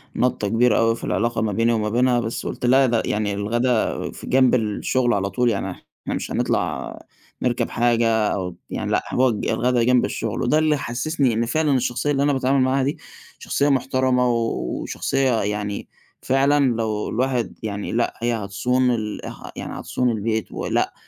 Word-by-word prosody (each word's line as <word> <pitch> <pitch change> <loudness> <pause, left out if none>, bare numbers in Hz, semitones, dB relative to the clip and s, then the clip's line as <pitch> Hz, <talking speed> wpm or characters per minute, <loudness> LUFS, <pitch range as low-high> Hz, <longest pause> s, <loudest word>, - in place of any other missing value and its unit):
نَطّة 125 -4 0
كبيرة 115 +1 +3
أوي 115 0 +3
في - - -12
العلاقة 115 0 0
ما 110 -1 0
بيني 115 +4 +2
وما 105 -2 0
بينها 125 +2 +2
بس 115 -1 -4
قُلت - - -4
لا 135 +2 +5
ده 115 -3 +1
يعني 105 -1 -1
الغدا 115 +4 0
فجنب 130 -1 +2
الشغل 120 +2 0
على 100 -1 0
طول 125 +3 +1
يعني 100 -3 -2
إحنا - - -9
مش - - -4
هنطلَع - - -1 0.4
نركَب 120 -1 0
حاجة 120 -1 +2 0.3
أو 90 -3 -4
يعني - - -3
لأ - - +1
هنقعد 125 -4 +1
ج - - -2
الغدا 125 0 +1
جنب 125 +1 +3
الشغل، - - -3
وده 155 - +3
اللي 155 -1 +2
حسسني 130 +1 0
إن 115 +2 0
فعلًا 150 +5 +1
الشخصية 125 +3 -1
اللي 140 -1 +1
أنا 145 0 +2
باتعامل 135 0 +2
معاها 130 +1 +2
دي 140 +2 -1 0.4
شخصية 145 +1 0
مُحترَمة 130 -2 +2
وشخصية 120 +2 -1
يعني 105 0 -3 0.3
فعلًا 135 -1 +2
لو 110 -2 -2
الواحد 125 0 -1
يعني 100 -2 -4
لأ 120 +1 0
هي 120 0 +1
هتصون 125 +5 0
ال 110 -3 -3
اه - - -8
يعني - - -6
هتصون 125 -1 -1
البيت 110 0 -2
ولأ - - -1
120 Hz, 175 wpm, -22 LUFS, 110-130 Hz, 0.4 s, لا